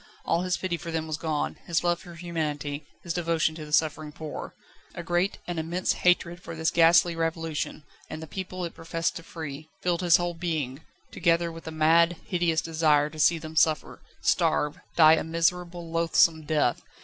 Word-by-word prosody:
All 170 - +1
his 185 0 0
pity 185 -2 -2
for 170 - -8
them 160 -1 -2
was 155 -1 -3
gone, 155 -2 -2
his 170 -1 +1
love 175 0 +1
for 175 -1 -12
humanity, 150 -4 -4 0.2
his 170 - -3
devotion 165 -2 +1
to 155 -1 -8
the - - -11
suffering 155 0 +1
poor. 155 -1 -7 0.4
A 175 - -5
great, 175 +3 0
an 175 -2 -3
immense 170 +3 -1
hatred 180 0 +1
for 165 -2 -8
this 160 0 0
ghastly 170 +1 +5
Revolution 165 -2 -3 0.3
and 155 - -6
the 160 - -7
people 185 +1 -5
it 170 - -6
professed 165 0 -2
to - - -8
free 155 -2 -8
filled 175 -1 +1
his 175 -2 +6
whole 175 0 -2
being, 160 -5 -3 0.3
together 170 -1 +1
with 165 0 -11
a - - -4
mad, 165 +2 +4
hideous 170 -3 +1
desire 155 -2 +2
to 155 - -10
see 165 +2 +4
them 160 0 -9
suffer, 155 0 +1 0.2
starve, 150 0 +1 0.2
die 160 -1 +8
a 160 - +2
miserable, 170 +1 -1
loathsome 165 -1 +3
death. 150 -6 +1
165 Hz, 185 wpm, -27 LUFS, 155-175 Hz, 0.4 s, die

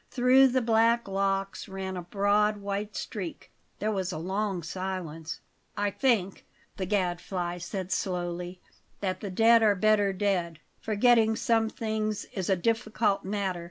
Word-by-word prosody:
Through 260 +1 +5
the 260 -1 +1
black 230 0 +3
locks 195 +1 -1
ran 190 0 -5
a 180 - -4
broad 205 +3 +1
white 200 +1 -4
streak. 185 -6 -6 0.3
There 215 +1 -1
was 190 -3 -2
a 155 - -4
long 190 +2 -2
silence. 165 -2 -5 0.4
"I 205 0 0
think," 210 -7 0 0.3
the 190 - -3
Gadfly 180 -2 -1
said 185 +1 -5
slowly, 180 -1 -3 0.4
"that 185 -2 -2
the 200 - -5
dead 225 +4 +5
are 210 -2 +4
better 205 0 +3
dead. 185 -4 -1 0.2
Forgetting 220 +1 +3
some 225 -1 +1
things 215 -2 -2
is 190 -2 -3
a 190 - +4
difficult 215 +1 0
matter. 195 -2 -2
200 Hz, 145 wpm, -28 LUFS, 185-215 Hz, 0.4 s, Through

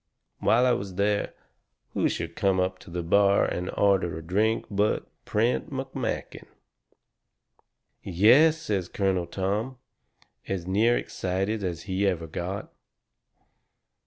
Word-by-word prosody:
"While 120 +3 +3
I 125 - +4
was 100 -5 -2
there, 100 +1 0 0.6
who - - +1
should 85 0 -4
come 95 -3 +2
up 95 0 -1
to - - -14
the 85 0 -4
bar 100 +3 +4
and 90 +1 -3
order 95 -5 +2
a 80 - -8
drink 105 +7 +1
but 100 +1 +1 0.2
Prent 115 +4 0
McMakin." 135 -3 -4 1.5
"Yes!" 125 - +5
says 100 - -2
Colonel 95 -3 0
Tom, 105 +8 -2 0.7
as 95 -3 -3
near 110 +6 +3
excited 95 +3 -2
as 85 -3 -3
he 95 +1 0
ever 85 -4 -1
got. 90 +5 -5
100 Hz, 125 wpm, -26 LUFS, 90-110 Hz, 1.5 s, Yes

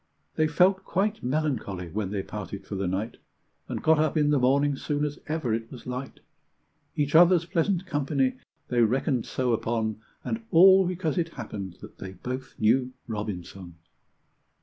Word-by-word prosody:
They 155 - +2
felt 180 +5 +3
quite 205 +3 -1
melancholy 125 - -2
when 100 0 -2
they 100 -1 -2
parted 100 -1 -7
for - - -8
the 95 -1 -1
night, 100 +6 -3 0.5
And - - -4
got 160 -1 +4
up 155 0 +1
in 150 -1 +3
the 145 - +3
morning 140 +3 +3
soon 145 +2 -1
as 145 -1 -5
ever 155 -7 -1
it 115 0 -3
was 125 - -10
light; 125 +1 -6 0.7
Each 145 -1 0
other's 175 +1 +6
pleasant 180 +2 0
company 140 -5 0 0.3
they 120 -1 +2
reckoned 125 +2 +1
so 125 -2 0
upon, 110 -1 -1 0.2
And 225 0 -3
all 190 +2 +7
because 175 -2 -1
it 165 -1 -1
happened 100 -7 -6
that - - -12
they 95 -1 -7
both 130 +7 -6
knew 125 +4 +2
Robinson! 95 -5 -6
130 Hz, 165 wpm, -27 LUFS, 110-155 Hz, 0.7 s, all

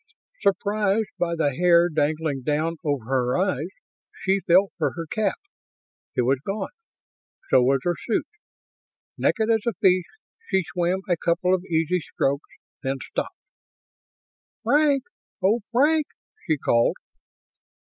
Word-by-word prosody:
Surprised 205 +1 +1
by 170 -1 0
the 145 -4 +1
hair 170 +2 +5
dangling 155 -3 -1
down 155 +5 -1
over 145 -7 -1
her 125 0 +1
eyes, 180 -5 0 0.6
she 195 +1 +2
felt 190 +3 +5
for - - 0
her 165 -1 -5
cap. 200 +4 -1 0.8
It 125 - +2
was 130 +2 +2
gone. 195 +4 -3 0.8
So 130 - +6
was 135 +1 +2
her 175 - +1
suit. 225 - +1 0.9
Naked 225 -1 +2
as 225 -1 +3
a 235 - +2
fish. 185 -2 +3 0.4
She 190 -1 +2
swam 180 +2 -1
a 175 -2 +1
couple 175 +3 +1
of 185 -1 +1
easy 165 0 +1 0.2
strokes, 140 +2 0 0.3
then 135 -1 -2
stopped. - - -4 1.3
"Frank! 290 -2 +3 0.4
Oh, 210 +5 +4
Frank!" 295 +5 +3 0.4
she 155 - +2
called. 115 -3 +2
175 Hz, 130 wpm, -24 LUFS, 150-200 Hz, 1.3 s, So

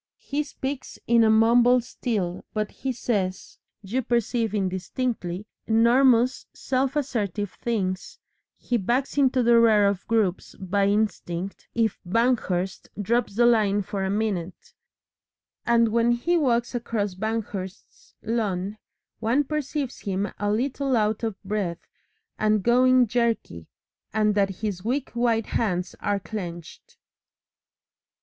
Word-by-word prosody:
He 290 +1 -3
speaks 275 -2 -5
in 235 -1 +4
a 220 - +4
mumble 235 +3 +5
still, 220 -7 -3
but 215 -1 -1
he 265 - -4
says, 200 -6 -3 0.2
you 225 +7 -1
perceive 235 -2 0
indistinctly, 190 0 -2 0.2
enormous 240 +2 +4
self 265 +1 -1
assertive 210 - -2
things, 190 -6 -3 0.4
he 245 - -1
backs 240 +6 -1
into 260 -2 +3
the 235 0 +5
rear 215 -3 +5
of 200 -1 -1
groups 215 -5 0
by 195 +1 +1
instinct 200 -3 -2
if 225 -3 +1
Banghurst 195 -3 0
drops 225 0 0
the 240 +2 +4
line 210 -4 +3
for 195 +1 -3
a 190 - -1
minute, 195 -4 -3 0.9
and 235 -1 +4
when 235 +2 +3
he 330 +9 0
walks 245 -7 +1
across 225 -5 -2
Banghurst's 200 -2 -5
lawn 210 -3 -2 0.4
one 235 +6 +2
perceives 290 -2 -3
him 200 0 -2
a 205 0 0
little 265 +3 0
out 215 0 +1
of 220 -4 -3
breath 190 -4 -3 0.5
and 215 -2 +2
going 255 +2 +5
jerky, 230 - -1 0.4
and 215 -1 +2
that 200 -1 +2
his 200 -4 -3
weak 260 +5 -2
white 235 -2 +1
hands 180 -5 -1
are 205 -1 0
clenched. 175 -3 -8
220 Hz, 125 wpm, -25 LUFS, 195-240 Hz, 0.9 s, mumble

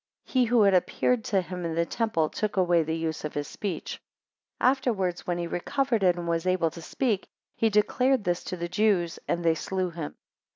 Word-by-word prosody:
he 255 -2 +2
who 235 -1 +4
had 200 -1 +5
appeared 220 +6 +2
to 195 -3 +1
him 180 +1 -6
in 165 -1 -2
the 170 0 +2
temple 220 -7 0
took 210 +4 -3
away 175 -2 +4
the 160 +1 -2
use 160 -1 -3
of 150 - -5
his 145 -1 -2
speech. 200 -5 -5 0.6
Afterwards 235 -9 +1
when 175 -1 0
he 175 - -2
recovered 235 +7 -1
it, 180 -2 +4
and 175 -1 -5
was 165 +1 0
able 185 -3 +2
to 170 - -10
speak, 215 +2 -1 0.3
he 225 - +2
declared 250 +4 +2
this 175 -2 -1
to 180 - -4
the 170 0 -3
Jews; 180 -2 +1
and 170 0 -1
they 165 - +5
slew 185 +2 -2
him. 165 -3 -6
180 Hz, 205 wpm, -27 LUFS, 170-215 Hz, 0.6 s, had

